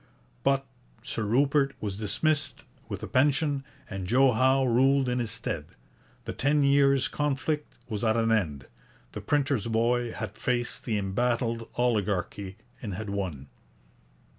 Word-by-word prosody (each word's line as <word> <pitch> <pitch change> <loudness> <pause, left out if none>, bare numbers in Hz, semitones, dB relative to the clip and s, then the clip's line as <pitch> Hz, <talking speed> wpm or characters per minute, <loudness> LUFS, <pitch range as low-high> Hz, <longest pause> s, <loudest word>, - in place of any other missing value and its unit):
But 135 0 +2 0.4
Sir - - -3
Rupert 135 +5 +2
was 100 -2 -4
dismissed 145 +8 0 0.2
with - - -5
a - - -3
pension, 140 +1 +2 0.2
and 95 -4 -5
Joe 130 +5 +5
Howe 130 +3 +3
ruled 130 +2 +3
in 125 0 0
his 120 -2 -1
stead. - - -2 0.6
The - - -4
ten 145 +2 +2
years' 140 -1 +4
conflict 150 +1 -2
was 105 -1 -4
at 110 0 +2
an 115 0 +2
end. 75 - 0 0.5
The - - -6
printer's 140 -6 0
boy 120 +1 +1
had 110 -2 -6
faced 120 +1 -2
the 110 -4 0
embattled 115 +3 -1
oligarchy, 100 -4 -1 0.2
and 100 -5 -4
had 105 0 -5
won. 90 -9 -3
120 Hz, 140 wpm, -28 LUFS, 105-135 Hz, 0.6 s, Joe